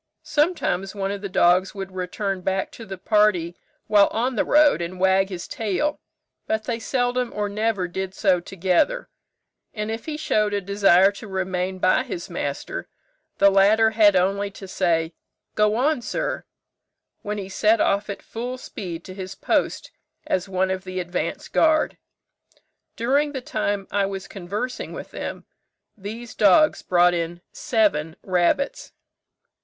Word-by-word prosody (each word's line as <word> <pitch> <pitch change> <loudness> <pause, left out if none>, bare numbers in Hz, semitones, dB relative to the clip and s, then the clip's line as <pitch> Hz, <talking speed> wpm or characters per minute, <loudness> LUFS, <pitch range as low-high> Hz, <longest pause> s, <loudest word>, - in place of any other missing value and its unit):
Sometimes 295 - 0
one 195 -1 -2
of 200 -1 -5
the 200 - -4
dogs 180 +2 +3
would 195 -1 -6
return 185 +1 -3
back 190 +1 -1
to 225 - -11
the 190 0 -6
party 185 -4 +2 0.3
while 205 -1 +5
on 245 +3 -1
the - - +2
road, 300 - +4
and 175 +2 -5
wag 190 +1 +3
his 180 -3 -6
tail, 225 +8 -1 0.5
but 220 0 0
they 235 0 -3
seldom 245 0 0
or 210 0 -2
never 205 -2 -1
did 190 +2 -5
so 190 -4 +3
together; 190 - 0 0.7
and 210 0 -3
if 225 0 -5
he 305 -1 -3
showed 210 -8 +1
a - - +1
desire 195 -1 +4
to 205 +2 -10
remain 185 -1 -2
by 185 +6 +3
his 265 +7 -6
master, - - -4 0.5
the 200 0 +6
latter 215 +3 +5
had 210 -2 +5
only 195 +2 +1
to 195 0 -11
say, 170 -3 0 0.4
'Go 210 0 +2
on, 275 +3 +1
sir,' - - -3 0.8
when 210 +1 -4
he 195 -2 -5
set 215 +3 +2
off 200 +1 +1
at 200 - -6
full 245 +3 -5
speed 175 -8 -7
to 185 - -9
his 190 0 -7
post - - -1 0.3
as 185 +1 -1
one 190 0 0
of 185 0 -3
the 185 0 -5
advanced 175 0 -4
guard. 315 -1 +3 1.0
During 285 +5 +1
the 265 - -3
time 205 -4 -2
I 200 -1 +1
was 195 -1 -6
conversing 205 +7 -5
with - - -8
them - - -6 0.5
these 220 +3 -8
dogs 215 +10 +4
brought 175 0 +4
in 170 0 -3
seven 200 - 0
rabbits." 185 +9 0
200 Hz, 155 wpm, -23 LUFS, 185-225 Hz, 1.0 s, the